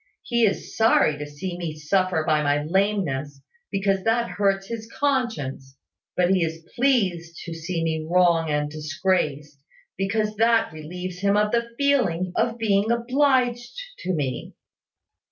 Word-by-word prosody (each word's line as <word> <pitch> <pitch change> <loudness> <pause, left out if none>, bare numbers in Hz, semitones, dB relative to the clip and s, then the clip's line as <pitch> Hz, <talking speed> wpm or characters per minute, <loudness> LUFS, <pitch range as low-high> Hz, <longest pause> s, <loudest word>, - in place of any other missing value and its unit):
He 235 -2 +2
is 200 - -3
sorry 220 -9 +4
to 150 - -5
see 175 +5 -6
me 165 -3 -4
suffer 180 +2 +1
by 155 -1 +2
my 145 0 +1
lameness; 160 -6 0 0.3
because 195 -1 0
that 235 +1 +1
hurts 195 -1 +1
his 225 +1 -7
conscience: 185 - -2 0.4
but 180 0 +3
he 185 -3 +3
is 165 0 -4
pleased 190 -11 +1
to 170 - -5
see 165 +1 -3
me 160 -1 -2
wrong 170 -2 +3
and 150 0 0
disgraced, 150 -2 -2 0.4
because 210 +2 0
that 230 -4 +3
relieves 180 +4 -7
him 200 +1 +2
of 210 0 +2
the 235 0 0
feeling 230 -12 +1
of 235 0 +1
being 210 -2 +1
obliged 245 - +1 0.2
to 185 -1 -2
me. 130 -5 -3
185 Hz, 145 wpm, -24 LUFS, 155-225 Hz, 0.4 s, sorry